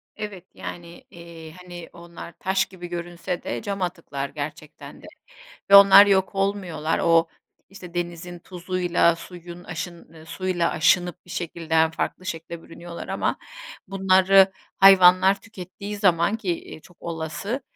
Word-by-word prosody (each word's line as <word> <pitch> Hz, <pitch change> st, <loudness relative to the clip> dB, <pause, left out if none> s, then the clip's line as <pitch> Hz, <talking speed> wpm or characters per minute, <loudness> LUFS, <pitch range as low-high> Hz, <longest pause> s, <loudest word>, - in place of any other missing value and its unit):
Evet. 205 Hz, -4 st, -7 dB
Yani, 170 Hz, 0 st, -9 dB
eee, 170 Hz, -2 st, -12 dB
hani, 175 Hz, -1 st, -10 dB
onlar 170 Hz, 0 st, -11 dB
taş 190 Hz, 0 st, 0 dB
gibi 180 Hz, -2 st, -10 dB
görünse 175 Hz, +1 st, -5 dB
de -, -, -4 dB
cam 200 Hz, -2 st, -5 dB
atıklar 155 Hz, -6 st, -4 dB
gerçekten 145 Hz, +1 st, -9 dB
de -, -, -14 dB, 0.7 s
ve -, -, +10 dB
onlar 200 Hz, 0 st, +9 dB
yok 195 Hz, -1 st, +1 dB
olmuyorlar. 190 Hz, -5 st, -1 dB
O, 165 Hz, 0 st, +3 dB, 0.4 s
işte, 180 Hz, -3 st, -12 dB
denizin 175 Hz, 0 st, -5 dB
tuzuyla 175 Hz, -1 st, 0 dB
suyun 175 Hz, 0 st, -11 dB
aşın 170 Hz, 0 st, -8 dB
eee, 160 Hz, -1 st, -14 dB
suyla 175 Hz, +1 st, -2 dB
aşınıp 175 Hz, +1 st, +1 dB
bir -, -, -19 dB
şekilde 165 Hz, -1 st, -5 dB
hem 160 Hz, 0 st, +4 dB
farklı 185 Hz, +2 st, -4 dB
şekle 165 Hz, -1 st, -6 dB
bürünüyorlar 170 Hz, 0 st, -10 dB
ama -, -, -2 dB, 0.5 s
bunları 190 Hz, 0 st, +4 dB, 0.3 s
hayvanlar 190 Hz, 0 st, +6 dB
tükettiği 200 Hz, 0 st, -9 dB
zaman 190 Hz, +1 st, +2 dB
ki, 200 Hz, -5 st, -5 dB, 0.2 s
eee, -, -, -10 dB
çok 175 Hz, +2 st, -20 dB
olası, 170 Hz, -, -5 dB
175 Hz, 140 wpm, -23 LUFS, 170-190 Hz, 0.7 s, ve